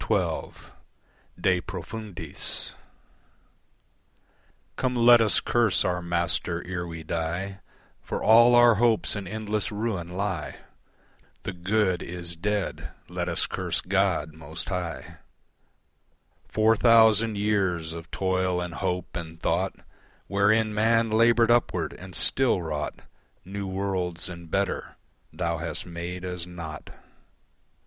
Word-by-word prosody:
De 90 -1 +2
Profundis 95 -2 -6 2.0
Come 130 -1 -1
let 120 0 +7
us 110 - +3
curse 120 -5 +2
our 90 -1 0
Master 85 0 -1
ere 90 -1 -4
we 80 -1 -7
die, 85 +5 -3 0.4
For - - -4
all 120 +2 +7
our 120 -1 +7
hopes 115 -3 +2
in 100 -2 -5
endless 105 0 -2
ruin 105 -5 -2
lie. 90 -3 -3 0.9
The 95 - -4
good 95 +1 0
is 85 -1 -4
dead. 105 +3 -2 0.2
Let - - -3
us - - +1
curse - - -1
God 90 -5 0
most 80 +1 -6
High. 90 -4 -5 1.3
Four 110 +1 +3
thousand 110 -2 +5
years 95 -6 0
of 85 -1 -9
toil 95 -1 0
and 90 -1 -4
hope 90 -1 -3
and 85 -1 -6
thought 90 +4 0 0.5
Wherein 105 +2 +2
man 115 +1 +2
laboured 115 +1 +4
upward 90 -9 +1
and 90 -2 -11
still 130 - +3
wrought 75 -2 -4 0.4
New 100 +1 -5
worlds 95 -3 -2
and 85 -2 -9
better, 95 +2 -2 0.4
Thou 85 -2 -2
hast 85 0 -2
made 90 +1 -6
as 90 -1 -3
naught. 85 -3 -8
95 Hz, 115 wpm, -26 LUFS, 85-110 Hz, 2.0 s, let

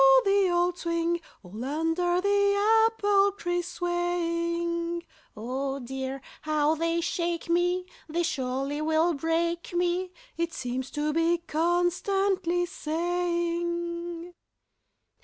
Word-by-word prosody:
the 395 -1 +4
old 350 0 +2
swing, 335 0 0 0.2
All 205 +6 -7
under 325 +5 +1
the 405 +2 +4
apple 405 -3 +3
trees 350 -2 -2
swaying: 340 -1 -1 0.3
"Oh 265 +5 -2
dear! 265 +1 -5 0.2
how 305 0 +2
they 335 +1 0
shake 340 0 -2
me! 355 +1 +2 0.2
They 340 +3 0
surely 275 -1 -2
will 320 +2 +2
break 330 +3 -1
me!" 355 +1 +1 0.3
It 335 0 -1
seems 255 +1 -3
to 300 0 -1
be 330 +2 +3
constantly 350 +2 +1
saying. 345 0 -2
340 Hz, 100 wpm, -27 LUFS, 315-350 Hz, 0.3 s, the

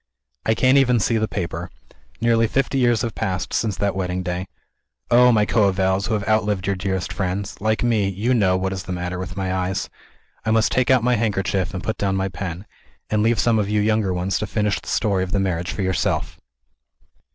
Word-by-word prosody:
I 110 - +3
can't 130 +4 +4
even 125 -3 +3
see 115 +2 +1
the 110 - 0
paper. 90 -3 -4 0.5
Nearly 115 -1 +3
fifty 135 +3 0
years 120 -3 +2
have 115 -2 -2
passed, 90 -2 -3
since 105 -4 0
that 100 -1 0
wedding 90 -1 -2
day. 90 +1 -3 0.6
Oh, 125 +1 +7
my 105 -3 +3
coevals, 95 -2 +2
who 110 - 0
have 105 -1 -3
outlived 105 -3 +1
your 100 - 0
dearest 95 0 -3
friends, 95 +1 -3
like 110 +2 0
me, 110 -5 +2
you 105 +7 0
know 95 -6 +3
what 95 +1 -2
is 95 - -4
the 95 - -5
matter 90 0 -4
with 90 -1 -6
my 95 -1 -1
eyes! 95 +1 -2 0.5
I 115 - -2
must 110 0 +3
take 130 -2 +1
out 130 -3 +4
my 125 0 +2
handkerchief, 95 -3 0
and 90 - -5
put 110 - -3
down 95 -1 0
my 95 0 -1
pen 90 0 -6 0.5
and 105 0 +2
leave 115 +1 +2
some 115 +1 +2
of 100 -1 -1
you 105 0 +1
younger 105 -2 +1
ones 90 +1 -1
to 105 - -3
finish 105 0 0
the - - -9
story 100 -4 +1
of 90 - -6
the 100 - +2
marriage 90 -2 -1
for 100 - -3
yourself. 95 0 -1
100 Hz, 215 wpm, -22 LUFS, 95-110 Hz, 0.6 s, Oh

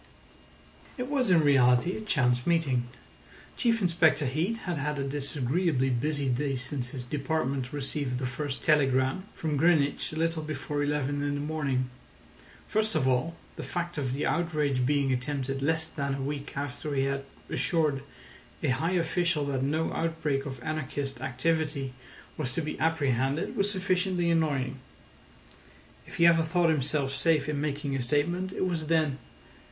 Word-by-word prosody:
It 250 0 -3
was 260 -6 +2
in 175 -3 +6
reality 130 +3 +4
a - - -5
chance 125 - +1
meeting. 140 -8 +2 0.7
Chief 230 -3 +1
Inspector 165 -4 +3
Heat 160 - 0
had 175 -4 -2
had 150 +1 -1
a 140 - -1
disagreeably 135 +1 0
busy 145 +3 0
day 135 +2 0
since 125 0 -4
his 125 -1 -6
department 135 -1 -1
received 140 -2 -2
the 130 - -2
first 135 +2 -3
telegram 135 +3 +3
from 155 -3 -1
Greenwich 150 -2 +3
a - - -7
little 165 0 0
before 150 -1 -3
eleven 145 -1 0
in 145 0 0
the - - -2
morning. 145 -4 -1 0.8
First 215 -2 +1
of 140 -4 +2
all, 130 +6 +1 0.2
the - - -4
fact 175 -2 -3
of 130 -3 -1
the 140 - -1
outrage 150 -7 +1
being 140 -2 +2
attempted 135 +1 -2
less 160 +3 +2
than 140 -3 -3
a 135 - -4
week 140 0 -4
after 145 +1 -3
he 135 - +2
had 135 0 -1 0.2
assured 145 +1 +1 0.6
a - - +2
high 160 +8 +1
official 170 -3 +1
that 135 -2 -1
no 155 +4 0
outbreak 155 -4 -1
of 130 -3 -7
anarchist 145 -3 -3
activity 140 0 -1 0.4
was 135 -5 -2
to 165 - 0
be 155 -1 -4
apprehended 145 - +1
was 200 -2 +2
sufficiently 185 -2 +1
annoying. 140 -5 0 1.3
If - - -10
he 170 - +4
ever 170 -1 +6
thought 165 +1 +2
himself 140 -1 0
safe 150 +1 +2
in 150 -2 -1
making 145 -1 -2
a 135 - -1
statement, 170 +9 0
it 185 - -1
was 165 -4 -1
then. 155 -4 +2
145 Hz, 160 wpm, -29 LUFS, 135-165 Hz, 1.3 s, in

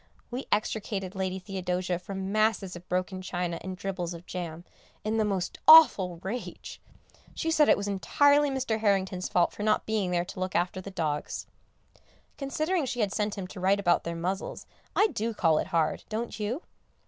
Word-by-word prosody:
We 250 +3 -4
extricated 205 -2 -1
Lady 190 -1 -2
Theodosia 185 -2 -2
from 190 +1 -5
masses 215 -3 +1
of 175 +1 -12
broken 185 +1 -1
china 175 -2 -3
and 185 0 -6
dribbles 180 -2 -3
of 170 +1 -11
jam, 170 -2 -6 0.4
in 215 +1 0
the 220 - +3
most 195 -4 -2
awful 195 - +8
rage. 235 +6 -6 0.5
She 325 - -1
said 305 -2 +4
it - - +6
was 200 0 -3
entirely 285 +9 +3
Mr. 260 -5 -1
Harrington's 190 -3 +1
fault 175 -1 +3
for - - -8
not 215 0 +2
being 215 -4 0
there 175 -1 0
to 190 0 -8
look 185 0 -3
after 180 +2 0
the 200 - -8
dogs. 155 -5 -3 0.9
Considering 310 +3 -1
she 245 -1 -2
had 200 -2 0
sent 210 -1 -1
him 195 - -4
to 195 - -9
write 195 +2 +3
about 175 -3 +2
their 170 0 -4
muzzles, 185 +4 -3 0.3
I 415 - +5
do 225 +1 -2
call 160 -5 +3
it - - -2
hard, 165 -2 0
don't 225 +1 -4
you? 230 - -2
195 Hz, 185 wpm, -28 LUFS, 180-220 Hz, 0.9 s, awful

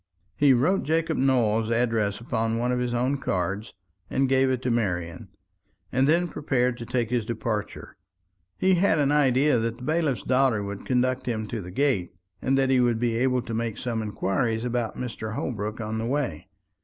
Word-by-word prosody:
He 145 -1 +4
wrote 150 +10 +3
Jacob 160 +2 0
Nowell's 115 -5 +2
address 115 -4 +1
upon 115 -1 -1
one 120 +2 0
of 125 - 0
his 125 -1 -1
own 125 +4 0
cards, 95 0 -2 0.3
and 135 0 +1
gave 130 0 +3
it 130 -1 -1
to 125 - 0
Marian; 90 -7 -2 0.6
and 130 +3 +2
then 175 +3 +3
prepared 125 -6 0
to 115 - -7
take 120 -2 -1
his 120 -2 +1
departure. 110 -1 -4 0.6
He 190 0 +3
had 180 -2 +3
an 145 -1 +2
idea 140 -2 +3
that 115 +1 -2
the 125 - -11
bailiff's 155 - 0
daughter 130 -5 +2
would 100 0 -6
conduct 130 0 0
him 110 -3 -2
to 115 - -3
the 90 - -8
gate, 95 -5 0 0.3
and 135 +1 +1
that 135 -1 +2
he 130 - +4
would 120 -2 +2
be 115 0 0
able 125 0 +1
to 115 - -6
make 115 -1 -2
some 115 -2 -2
inquiries 110 +2 -1
about 120 -2 -2
Mr. 110 -3 -5
Holbrook 105 -2 -3
on 110 0 -3
his 115 +1 -2
way. 130 - -2
120 Hz, 190 wpm, -26 LUFS, 110-130 Hz, 0.6 s, He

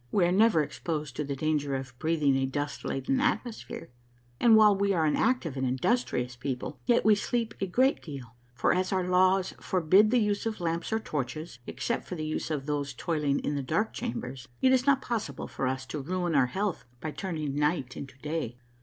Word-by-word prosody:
We 190 -4 +3
are 175 - +2
never 200 -4 +4
exposed 150 -2 -4
to 150 - 0
the 140 -1 -3
danger 145 -1 0
of 130 -1 -5
breathing 155 -4 +2
a 135 0 +1
dust 145 +1 -3
laden 135 - -1
atmosphere, 240 - -2 0.5
and 230 -2 +6
while 210 -2 +7
we 200 0 +1
are 165 -3 +2
an 150 - +2
active 220 - +1
and 130 - -2
industrious 130 - 0
people, 125 0 -4
yet 240 -1 +3
we 215 - +7
sleep 230 +2 -1
a 195 - 0
great 260 +9 +2
deal; 135 -7 -8 0.2
for, - - +2
as 185 0 0
our 185 -2 0
laws 185 +1 +3
forbid 185 +4 +4
the 250 - +3
use 210 -1 +1
of 220 -2 -3
lamps 170 +1 -2
or 220 - +2
torches, 150 - -4
except 235 - -3
for 180 - -4
the 155 -2 -4
use 155 - -3
of 145 -4 -2
those 145 -2 -2
toiling 150 -1 0
in 145 - -1
the 140 - -1
dark 215 - 0
chambers, 125 +2 -5
it 260 - +4
is 260 +1 +3
not 280 -1 +4
possible 210 - -3
for 135 - -2
us 130 0 -2
to 140 +3 -5
ruin 175 +3 -1
our 135 -4 +4
health 195 +6 -2 0.2
by 155 - -4
turning 155 -6 -3
night 150 -3 0
into 135 -1 -8
day. 150 -6 -3
160 Hz, 205 wpm, -29 LUFS, 140-200 Hz, 0.5 s, while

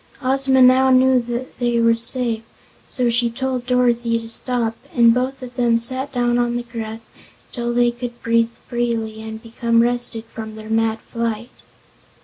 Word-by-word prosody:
Ozma 265 0 +3
now 260 +1 +5
knew 255 -1 +2
they 240 -1 +1
were 230 0 +4
safe, 230 0 +1 0.5
so 250 -2 -1
she 235 0 +1
told 255 0 -3
Dorothy 240 -2 +2
to 230 0 -6
stop 230 0 0 0.2
and 235 -1 +6
both 255 +2 -2
of 250 0 -9
them 235 -2 +3
sat 260 +4 0
down 245 -1 +1
on 240 0 0
the 240 - -4
grass 225 -1 -7 0.4
until 240 -1 -3
they 240 0 +2
could 240 0 -7
breathe 230 0 +2 0.2
freely 230 -2 -2
and 220 +1 -8
become 230 0 +1
rested 240 -1 -1
from 220 -1 -8
their 220 0 -9
mad 225 0 +1
flight. 230 0 -4
240 Hz, 160 wpm, -20 LUFS, 230-250 Hz, 0.5 s, and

